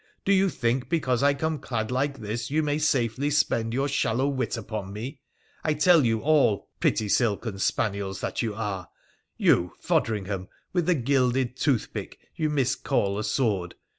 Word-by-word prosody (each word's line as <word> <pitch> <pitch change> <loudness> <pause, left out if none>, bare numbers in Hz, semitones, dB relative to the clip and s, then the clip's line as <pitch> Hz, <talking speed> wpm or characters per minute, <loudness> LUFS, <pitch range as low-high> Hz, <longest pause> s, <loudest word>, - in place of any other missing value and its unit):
Do 200 - +4
you 195 0 +4
think, 125 -3 -1
because 135 -8 +1
I 140 0 +4
come 160 +1 -1
clad 115 -3 -3
like 135 +2 0
this, 110 +2 -4
you 155 +3 +1
may 150 0 0
safely 135 -2 +1
spend 115 -6 +1
your 135 +4 0
shallow 135 -1 +1
wit 130 -6 -1
upon 105 -3 -5
me? 125 +8 -6 0.4
I 155 -1 +1
tell 160 +1 +5
you 115 -2 +1
all, 145 -9 +2
pretty 110 - +1
silken 105 -2 0
spaniels 100 -2 -1
that - - -2
you 110 -4 -2
are! 100 -4 -4 0.5
you, 85 -1 +3
Fodringham, 100 -3 -1 0.3
with 175 -3 +1
the 180 - +4
gilded 130 -1 +1
toothpick 130 -5 -1 0.2
you 155 -1 0
miscall 130 -7 0
a - - -2
sword 105 -6 0
125 Hz, 165 wpm, -26 LUFS, 110-145 Hz, 0.5 s, tell